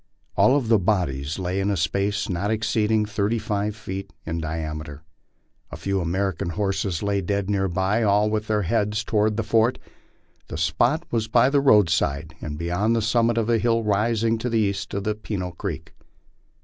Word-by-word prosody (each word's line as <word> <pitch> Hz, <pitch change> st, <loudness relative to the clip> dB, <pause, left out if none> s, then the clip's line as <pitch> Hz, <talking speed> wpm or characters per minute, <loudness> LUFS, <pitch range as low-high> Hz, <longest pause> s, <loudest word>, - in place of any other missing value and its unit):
All 140 Hz, +3 st, +5 dB
the 115 Hz, -4 st, +2 dB
bodies 80 Hz, -7 st, -1 dB
lay 95 Hz, 0 st, -2 dB
in 100 Hz, +1 st, 0 dB
a 100 Hz, -, 0 dB
space 100 Hz, +5 st, 0 dB
not 95 Hz, +3 st, -2 dB
exceeding 110 Hz, 0 st, +1 dB
thirty 105 Hz, +2 st, -1 dB
five 105 Hz, -2 st, -2 dB
feet 95 Hz, -2 st, -6 dB
in 80 Hz, +1 st, -3 dB
diameter. 75 Hz, -1 st, -5 dB, 0.7 s
A -, -, -6 dB
few 95 Hz, +4 st, -1 dB
American 90 Hz, 0 st, -1 dB
horses 95 Hz, -1 st, -1 dB
lay 100 Hz, -1 st, 0 dB
dead 100 Hz, +2 st, -1 dB
near 95 Hz, -1 st, +1 dB
by, 95 Hz, +5 st, 0 dB
all 105 Hz, -1 st, +3 dB
with 110 Hz, 0 st, -1 dB
their 105 Hz, -1 st, +1 dB
heads 105 Hz, +2 st, 0 dB
toward 105 Hz, 0 st, +1 dB
the 115 Hz, -, 0 dB
fort. 115 Hz, +3 st, +2 dB, 0.7 s
This 80 Hz, -, -5 dB
spot 120 Hz, -, +1 dB
was 115 Hz, -2 st, 0 dB
by 120 Hz, +4 st, +4 dB
the 140 Hz, -1 st, +3 dB
roadside 80 Hz, -, +3 dB
and 75 Hz, -1 st, -5 dB
beyond 90 Hz, +7 st, 0 dB
the 115 Hz, -, +1 dB
summit 115 Hz, +1 st, +2 dB
of 115 Hz, -1 st, +1 dB
a 115 Hz, -1 st, +2 dB
hill 115 Hz, +1 st, +1 dB
rising 110 Hz, +2 st, +1 dB
to 125 Hz, -, -2 dB
the 115 Hz, -, +1 dB
east 100 Hz, -2 st, -1 dB
of 100 Hz, -, -2 dB, 0.2 s
Peno 95 Hz, -5 st, -3 dB
creek. 85 Hz, -, -6 dB
105 Hz, 175 wpm, -24 LUFS, 90-110 Hz, 0.7 s, All